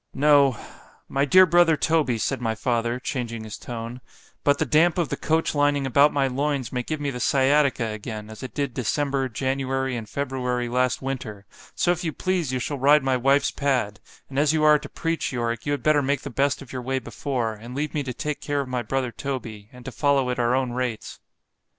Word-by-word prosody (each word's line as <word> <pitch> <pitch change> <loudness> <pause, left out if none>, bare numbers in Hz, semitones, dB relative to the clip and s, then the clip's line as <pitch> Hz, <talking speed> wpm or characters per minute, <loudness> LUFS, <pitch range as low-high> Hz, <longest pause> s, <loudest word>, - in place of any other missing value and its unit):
——No——my 140 -1 +1
dear 185 +5 +7
brother 175 -2 +4
Toby, 150 -6 +1
said 130 +4 -2
my 115 -2 -1
father, 120 +1 -1
changing 120 -4 -4
his 110 -1 -7
tone——but 120 +4 -4
the - - 0
damp 165 +3 +3
of 170 -4 0
the - - -1
coach 160 +1 0
lining 145 -1 +2
about 140 +3 +4
my 140 -1 +1
loins, 135 0 -1
may 125 - 0
give 155 +5 -4
me 145 -1 -2
the 125 - -6
sciatica 135 +1 +2
again, 110 0 -6
as 110 - -10
it 130 - -8
did 140 -4 -2
December, 135 +1 -1
January, 135 +1 -1
and 110 -3 -6
February 125 -3 -2
last 125 +1 0
winter—so 130 - -3
if 175 0 -2
you 165 - -1
please 180 -5 -1
you 130 - -1
shall 135 +3 -3
ride 145 +2 +5
my 135 -1 +2
wife's 135 +3 +2
pad——and 135 0 -3
as 150 +1 +3
you 155 -1 +1
are 150 0 +6
to - - -10
preach, 165 0 -2
Yorick, 120 -2 -3
you - - +1
had 145 -4 -2
better 155 -1 +4
make 140 0 0
the 140 - -7
best 140 +2 0
of 135 - -13
your 130 - -4
way 130 +2 -2
before——and 120 -4 -4
leave 150 +2 -2
me 150 - 0
to 130 -2 -4
take 150 +4 -4
care 145 -1 -1
of 135 - -6
my 125 -1 -2
brother 125 +2 -2
Toby, 115 -7 -6
and 125 0 -14
to 135 - -5
follow 135 0 +1
at 125 - -3
our 120 +1 +2
own 130 -2 0
rates. 125 -3 -4
135 Hz, 205 wpm, -24 LUFS, 125-145 Hz, -, dear